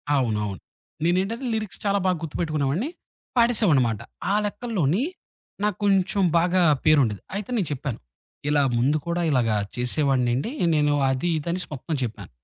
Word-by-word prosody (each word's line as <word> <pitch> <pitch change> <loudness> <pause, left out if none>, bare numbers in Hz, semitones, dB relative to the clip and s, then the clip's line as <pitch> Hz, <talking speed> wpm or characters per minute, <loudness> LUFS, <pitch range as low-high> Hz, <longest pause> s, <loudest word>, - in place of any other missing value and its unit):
అవునవును. 105 -7 -1 0.4
నేనేంటంటే, 195 +9 0
లిరిక్స్ 215 -3 -4
చాలా 200 0 +2
బాగా 185 -1 +2
గుర్తుపెట్టుకునే 155 -2 -2
వాడిని. 205 - -1 0.5
పాడసేవాడినన్నమాట. 165 - +3 0.3
ఆ - - +3
లెక్కల్లోని, 205 - 0 0.6
నాకు 210 -3 0
కొంచెం 195 0 +2 0.2
బాగా 180 +2 +2 0.2
పేరుండేది. 130 - +3
అయితే 205 +2 -4
నేను 190 -7 0
చెప్పాను, 135 -3 -4 0.5
ఇలా 150 -1 +3 0.2
ముందు 135 +6 +2
కూడా 170 +1 0
ఇలాగా 120 -6 +2 0.2
చేసేవాడినండి 130 - +1 0.2
నేను 150 -1 +3 0.2
అది 130 +6 0
ఇదనేసి 170 +4 -2
మొత్తం 150 +3 -4
చెప్పాను. 110 -5 -5
155 Hz, 130 wpm, -24 LUFS, 130-195 Hz, 0.6 s, పాడసేవాడినన్నమాట